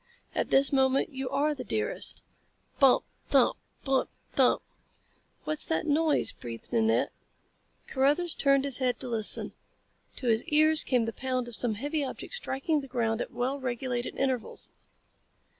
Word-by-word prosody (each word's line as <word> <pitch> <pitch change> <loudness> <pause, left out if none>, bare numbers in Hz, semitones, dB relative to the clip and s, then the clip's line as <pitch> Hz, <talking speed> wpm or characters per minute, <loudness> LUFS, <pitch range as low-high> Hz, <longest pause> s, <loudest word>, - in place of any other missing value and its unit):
At - - -1
this 275 +1 +4
moment 265 0 +2
you 265 -3 -5
are 285 +3 +1
the 265 -3 -6
dearest - - -1 0.3
" - - -38
Bump, 270 -2 +5 0.3
thump! - - +4 0.3
Bump, 270 -1 +1 0.2
thump! - - +3 0.8
"What's 305 0 -2
that 320 - -1
noise?" 310 0 +2
breathed 115 - -9
Nanette. 225 -1 +2 0.7
Carruthers 295 +6 +1
turned 275 0 +2
his 275 -2 +2
head 255 -2 0
to 260 - -4
listen. 225 -3 +3 0.6
To 260 - -5
his 225 -1 +2
ears 310 +1 +4
came 245 -3 +1
the 225 - -4
pound 255 -2 -2
of 240 - -1
some 230 -2 +2
heavy 290 +6 -2
object 270 - -6
striking 305 - -1
the 275 - -10
ground 235 -3 -1
at - - -4
well 255 +4 -2
regulated 245 -1 -3
intervals. 260 -3 -1
265 Hz, 155 wpm, -28 LUFS, 245-285 Hz, 0.8 s, Bump